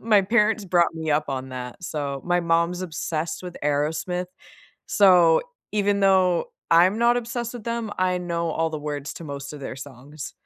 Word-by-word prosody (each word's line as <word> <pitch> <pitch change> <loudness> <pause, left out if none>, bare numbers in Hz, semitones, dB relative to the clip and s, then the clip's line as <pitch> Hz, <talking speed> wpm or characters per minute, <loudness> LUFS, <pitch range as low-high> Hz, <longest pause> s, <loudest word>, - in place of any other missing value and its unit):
My 215 -3 +4
parents 210 0 +2
brought 175 -2 +2
me 160 -1 -3
up 150 +1 +2
on 130 -1 -3
that, 125 +5 -7
so 140 -4 -4
my 175 0 +2
mom's 170 +1 +1
obsessed 160 0 -3
with 180 -1 -7
Aerosmith, 160 +5 -1 0.6
so, 180 -5 +5 0.3
even 205 -1 +1
though 185 -3 +3 0.2
I'm 180 +6 +5
not 240 +1 +4
obsessed 235 0 -4
with 235 - -7
them, 230 -2 -3
I 185 -1 +1
know 170 -1 -2
all 160 0 0
the 155 - -4
words 145 -1 -4
to 165 - -9
most 140 0 -6
of 145 - -9
their 130 - -6
songs. 140 +2 -9
170 Hz, 180 wpm, -24 LUFS, 150-195 Hz, 0.6 s, so